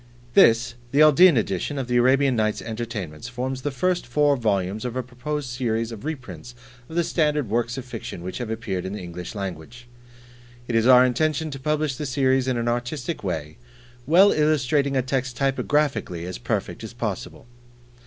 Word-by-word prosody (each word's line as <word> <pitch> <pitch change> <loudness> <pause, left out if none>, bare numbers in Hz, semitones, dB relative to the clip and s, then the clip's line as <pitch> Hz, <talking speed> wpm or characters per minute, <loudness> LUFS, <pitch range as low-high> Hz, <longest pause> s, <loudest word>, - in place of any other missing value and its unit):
This, 115 +2 +5 0.2
the 145 +2 +5
"Aldine 155 +1 +7
Edition" 105 +6 -1
of 135 -3 -3
"The 125 0 +1
Arabian 130 +2 +4
Nights 110 -1 0
Entertainments," 110 -4 -5
forms 130 +1 -4
the 145 - -1
first 175 +4 -1
four 145 +3 +3
volumes 105 -4 -1
of 125 -1 -4
a 130 - -1
proposed 135 +4 -5
series 115 -2 -1
of 115 +3 -9
reprints 120 - -7 0.3
of 160 - -8
the 170 - +2
Standard 150 - 0
works 120 +2 0
of 130 - -5
fiction 115 -8 -7
which 95 +6 -5
have 120 -3 -4
appeared 110 -5 -3
in 95 +1 -5
the 105 - -5
English 90 +3 -7
language. 100 +5 -7 0.8
It 120 - -3
is 115 +1 +3
our 125 0 +8
intention 155 +4 0
to 135 - -6
publish 150 -1 -1
the 150 - -4
series 130 -1 +1
in 130 -2 0
an 120 0 -2
artistic 125 +6 -3
way, 80 -5 -4 0.5
well 185 +6 +6
illustrating 145 -2 +2
a 130 - +1
text 130 -1 -2
typographically 135 - 0
as 90 -9 -6
perfect - - -3
as - - -8
possible. - - -5
125 Hz, 180 wpm, -24 LUFS, 110-140 Hz, 0.8 s, our